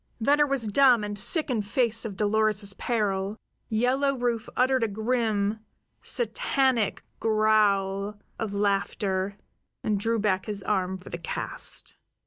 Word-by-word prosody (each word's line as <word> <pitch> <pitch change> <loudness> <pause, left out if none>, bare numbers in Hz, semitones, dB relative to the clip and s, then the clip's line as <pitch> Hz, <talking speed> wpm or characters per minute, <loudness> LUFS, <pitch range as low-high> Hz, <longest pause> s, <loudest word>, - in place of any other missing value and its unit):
Venner 290 +5 +3
was 270 -4 0
dumb 245 +1 +5
and 205 0 -4
sick 305 - +2
in 230 -4 +1
face 230 +2 0
of 200 -4 -5
Dolores's 210 -1 +1
peril. 200 -2 -1 0.3
Yellow 255 +5 +1
Rufe 240 -2 -1
uttered 260 -1 +3
a - - +2
grim, 220 -1 0 0.4
Satanic 270 - +1 0.2
growl 210 -2 +2 0.2
of 220 -3 -2
laughter, 200 -1 -1 0.5
and 210 -2 0
drew 230 +3 0
back 200 -2 0
his 205 -2 -4
arm 190 -2 0
for 185 - -12
the 170 - -5
cast. 170 - -3
215 Hz, 130 wpm, -26 LUFS, 200-240 Hz, 0.5 s, dumb